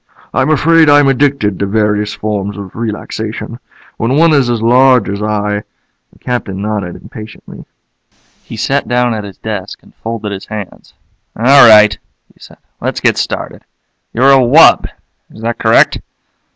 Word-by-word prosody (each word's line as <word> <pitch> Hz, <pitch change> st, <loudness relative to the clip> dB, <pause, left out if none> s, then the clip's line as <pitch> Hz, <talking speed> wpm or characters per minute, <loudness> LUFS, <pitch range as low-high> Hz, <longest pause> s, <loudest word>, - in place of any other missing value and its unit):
"I'm 130 Hz, +3 st, 0 dB
afraid 160 Hz, +1 st, +3 dB
I'm 145 Hz, -1 st, +5 dB
addicted 135 Hz, -7 st, 0 dB
to 100 Hz, -, -1 dB
various 105 Hz, 0 st, -1 dB
forms 105 Hz, -1 st, -4 dB
of 100 Hz, -2 st, -10 dB
relaxation. 110 Hz, +1 st, -6 dB, 0.4 s
When 120 Hz, +5 st, -1 dB
one 165 Hz, 0 st, +4 dB
is 135 Hz, -4 st, +2 dB
as 120 Hz, -1 st, -1 dB
large 125 Hz, 0 st, +3 dB
as 100 Hz, +1 st, -4 dB
I 105 Hz, -1 st, -2 dB, 0.3 s
" -, -, -51 dB
The -, -, -24 dB
Captain 120 Hz, -6 st, -4 dB
nodded 100 Hz, -4 st, -4 dB
impatiently. 110 Hz, 0 st, -12 dB, 0.8 s
He -, -, -10 dB
sat -, -, -1 dB
down 120 Hz, -1 st, 0 dB
at 110 Hz, -1 st, -5 dB
his 100 Hz, -2 st, -11 dB
desk 105 Hz, -2 st, -7 dB
and -, -, -21 dB
folded 110 Hz, -2 st, -6 dB
his 95 Hz, -1 st, -8 dB
hands. 105 Hz, -3 st, -9 dB, 0.4 s
"All 130 Hz, +2 st, +6 dB
right," 105 Hz, -2 st, +6 dB, 0.4 s
he -, -, -31 dB
said. -, -, -16 dB, 0.2 s
"Let's -, -, -3 dB
get -, -, +1 dB
started. -, -, -5 dB, 0.5 s
You're 130 Hz, +4 st, +3 dB
a 135 Hz, -, +6 dB
wub? 130 Hz, +6 st, +5 dB, 0.4 s
Is 110 Hz, -, -15 dB
that 115 Hz, 0 st, -3 dB
correct?" -, -, +3 dB
110 Hz, 160 wpm, -13 LUFS, 105-130 Hz, 0.8 s, All